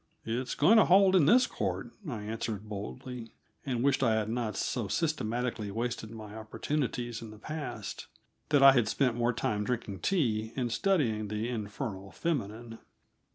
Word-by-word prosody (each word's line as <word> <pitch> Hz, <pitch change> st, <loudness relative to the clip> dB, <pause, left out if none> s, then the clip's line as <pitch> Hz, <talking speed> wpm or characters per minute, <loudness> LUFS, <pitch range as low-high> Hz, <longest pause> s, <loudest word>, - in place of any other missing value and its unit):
"It's 120 Hz, +3 st, -2 dB
going 190 Hz, +10 st, +6 dB
to -, -, +6 dB
hold 190 Hz, +1 st, +6 dB
in 160 Hz, -6 st, +5 dB
this 250 Hz, +8 st, +6 dB
court," 95 Hz, +2 st, -3 dB, 0.2 s
I 110 Hz, -6 st, -4 dB
answered 110 Hz, -1 st, -4 dB
boldly, 115 Hz, +3 st, -7 dB, 0.3 s
and 125 Hz, -2 st, 0 dB
wished 140 Hz, 0 st, +3 dB
I 110 Hz, -, +3 dB
had 110 Hz, -1 st, 0 dB
not 115 Hz, -2 st, -2 dB
so 120 Hz, -5 st, -1 dB
systematically 120 Hz, -, -1 dB
wasted 115 Hz, +1 st, -3 dB
my 110 Hz, -2 st, -9 dB
opportunities 120 Hz, +1 st, -3 dB
in 115 Hz, -, -8 dB
the 110 Hz, -, -11 dB
past 140 Hz, -5 st, -6 dB, 0.4 s
that 145 Hz, -2 st, +5 dB
I 135 Hz, -, +11 dB
had 120 Hz, -5 st, +3 dB
spent 125 Hz, +1 st, +1 dB
more 120 Hz, 0 st, +2 dB
time 105 Hz, -3 st, -1 dB
drinking 110 Hz, -4 st, -3 dB
tea 115 Hz, -, 0 dB
and 125 Hz, -3 st, -1 dB
studying 115 Hz, -, +1 dB
the 105 Hz, +3 st, -2 dB
"infernal 105 Hz, -3 st, -4 dB
feminine." 115 Hz, -7 st, -3 dB
115 Hz, 160 wpm, -30 LUFS, 110-135 Hz, 0.4 s, I